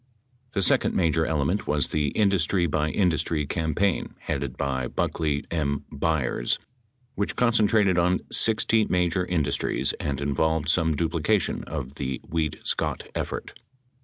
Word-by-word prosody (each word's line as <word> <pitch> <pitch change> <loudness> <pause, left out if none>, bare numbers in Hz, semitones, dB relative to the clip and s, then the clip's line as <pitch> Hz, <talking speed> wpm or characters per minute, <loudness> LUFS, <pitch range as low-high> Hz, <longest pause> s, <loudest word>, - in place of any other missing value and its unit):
The 100 - +1
second - - +3
major 80 -2 +2
element 80 +6 0
was 75 -2 +1
the 75 -1 0
industry 95 0 +2
by 75 -1 0
industry 80 -4 0
campaign 80 +5 -1
headed 70 -2 -3
by 65 -2 -1
Buckley 75 +2 -1
M. 70 -3 -1
Byers 70 -5 0 0.6
which 100 - -2
concentrated 110 -5 +3
on 90 +2 +2
60 110 0 +3
major 90 -1 +1
in 90 -3 0
dustries 70 0 0
and 70 -2 -2
involved 75 +2 0
some 80 -2 +2
duplication 85 +5 0
of 65 +2 -5
the 65 -1 -2
Weed 80 -2 -2
Scott - - -1
effort. - - -4
80 Hz, 130 wpm, -25 LUFS, 70-90 Hz, 0.6 s, second